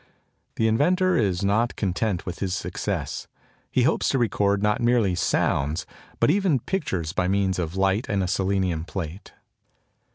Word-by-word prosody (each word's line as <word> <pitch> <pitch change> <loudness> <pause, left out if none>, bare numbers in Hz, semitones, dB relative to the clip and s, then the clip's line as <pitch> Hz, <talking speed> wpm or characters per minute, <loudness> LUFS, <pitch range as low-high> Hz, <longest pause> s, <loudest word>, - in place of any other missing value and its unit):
The 110 - +2
inventor 180 +11 +3
is 100 -4 +1
not 110 +4 +1
content 95 -1 -1
with 90 -1 -5
his 95 -2 -1
success. - - -3 0.4
He - - +2
hopes - - +2
to - - +1
record 100 -4 +1
not 105 +2 +1
merely 120 -5 +3
sounds 80 -2 0 0.3
but - - +4
even 190 -7 +2
pictures 95 - -2
by 90 - 0
means 95 -1 +1
of 85 +1 -3
light 95 +3 +1
and 100 -3 +1
a - - -1
selenium 95 -3 0
plate. 85 0 -6
100 Hz, 155 wpm, -25 LUFS, 90-115 Hz, 0.4 s, but